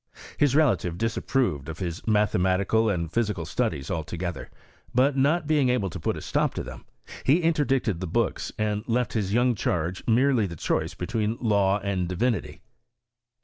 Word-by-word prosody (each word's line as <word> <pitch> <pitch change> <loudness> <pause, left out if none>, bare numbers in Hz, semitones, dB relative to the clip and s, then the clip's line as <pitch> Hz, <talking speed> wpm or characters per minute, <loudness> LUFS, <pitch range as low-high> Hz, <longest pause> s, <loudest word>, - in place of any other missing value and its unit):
His 145 -2 +2
relative 120 - +2
disap 115 +1 -2
proved 90 - 0
of 80 - -6
his 85 0 -5
mathematical 105 +1 +2
and 85 -5 -2
physical 110 -3 0
studies 70 - -1
si 80 - -1
together; 85 0 -5 0.5
but, 135 +3 +4
not 145 +5 +2
being 145 -4 +2
able 110 -7 0
to - - -6
put - - -1
a - - -6
stop - - 0
to - - -3
them, - - -10 0.4
he 150 +7 +4
interdicted 135 - +1
the 95 - -4
books, - - -1
and 105 -1 -1
left 125 +1 0
his 100 -4 -1
young 120 +3 +3
charge 90 -3 -2
merely 120 -2 +3
the 85 - -7
choice 80 +2 -1
between 110 +5 -2
law 100 -4 +2
and 95 -3 -1
diTtnity. 105 +3 -1
105 Hz, 170 wpm, -26 LUFS, 90-125 Hz, 0.5 s, but